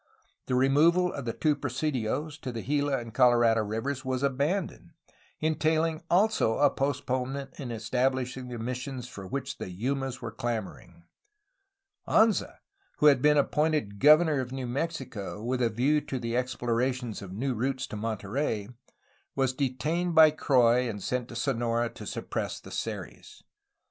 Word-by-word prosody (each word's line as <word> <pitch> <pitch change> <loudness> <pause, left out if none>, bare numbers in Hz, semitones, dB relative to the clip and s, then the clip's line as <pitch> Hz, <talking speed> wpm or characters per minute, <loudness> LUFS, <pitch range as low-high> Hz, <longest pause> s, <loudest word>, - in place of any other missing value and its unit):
The 125 - 0
removal 160 +8 +4
of 140 - -6
the 115 - -2
two 155 -2 +1
presidios 145 +2 -2
to 130 - -5
the 115 -2 -5
Gila 145 0 +1
and 115 -2 -7
Colorado 120 -3 +4
rivers 125 +6 -3
was 130 0 -2
abandoned, 155 +5 -1 0.5
entaiUng 160 0 +1
also 190 - +3
a 145 -1 +4
postponement 135 0 -2
in 135 -4 -5
establishing 125 +3 -1
the 120 -1 -6
missions 125 +2 -5
for 100 -6 -9
which 135 +4 -4
the - - -5
Yumas 130 +7 -3
were 115 - -6
clamor 115 -2 -3
ing. - - -20 1.0
Anza, 220 -1 +3 0.4
who - - +1
had 140 -4 +6
been 150 +1 +5
appointed 150 -8 +1
governor 155 +1 +6
of 125 -1 -4
New 130 -1 -4
Mexico 125 -7 -4
with 125 +2 -1
a 120 - +3
view 135 +7 +2
to 135 - -4
the 115 -1 -3
exploration 125 -1 -1
of 95 -2 -8
new 130 +7 -2
routes 130 +3 -1
to - - -8
Monterey, 110 +1 -2 0.7
was 135 -1 +1
detained 150 +7 -1
by 155 -1 +8
Croix 125 -4 +3
and 100 -3 -6
sent 125 -1 -2
to 120 - -10
Sonora 120 -1 0
to 105 - -9
suppress - - -4
the - - -13
Seris. - - -6
130 Hz, 155 wpm, -28 LUFS, 120-145 Hz, 1.0 s, by